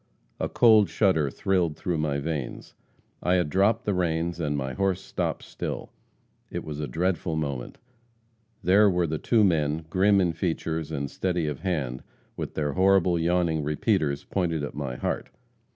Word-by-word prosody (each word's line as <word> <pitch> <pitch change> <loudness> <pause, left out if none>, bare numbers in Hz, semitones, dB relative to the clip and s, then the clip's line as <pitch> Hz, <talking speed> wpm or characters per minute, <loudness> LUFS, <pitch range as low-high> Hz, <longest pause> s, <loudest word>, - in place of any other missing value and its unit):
A - - -1
cold 110 -4 +5
shudder 85 -9 +2
thrilled 85 0 0
through 85 -3 -2
my 75 -2 0
veins. 70 -3 -4 0.5
I 90 +1 +2
had 85 -5 +1
dropped 100 +4 +2
the 105 - +1
reins, 85 -1 -1
and 75 -3 -1
my 65 -1 -3
horse 95 -2 0
stopped 95 - -3
still. - - -5 0.6
It - - -4
was 75 -1 -6
a 75 - -2
dreadful 85 +3 -1
moment. 70 -5 -3 0.9
There 100 +4 +5
were 90 -2 +1
the 80 -1 -2
two 115 -3 +3
men, 80 -4 +1
grim 100 +2 +4
in 90 -3 +2
features 80 -2 -2
and 70 -2 -2
steady 90 +2 -1
of 75 -3 -3
hand, 70 -9 -2 0.3
with - - -5
their 75 -2 -1
horrible, 95 -2 +3
yawning 85 -2 +1
repeaters 75 -2 0
pointed 85 -5 -1
at 70 - -4
my 70 -4 -4
heart. - - -3
85 Hz, 165 wpm, -26 LUFS, 75-95 Hz, 0.9 s, cold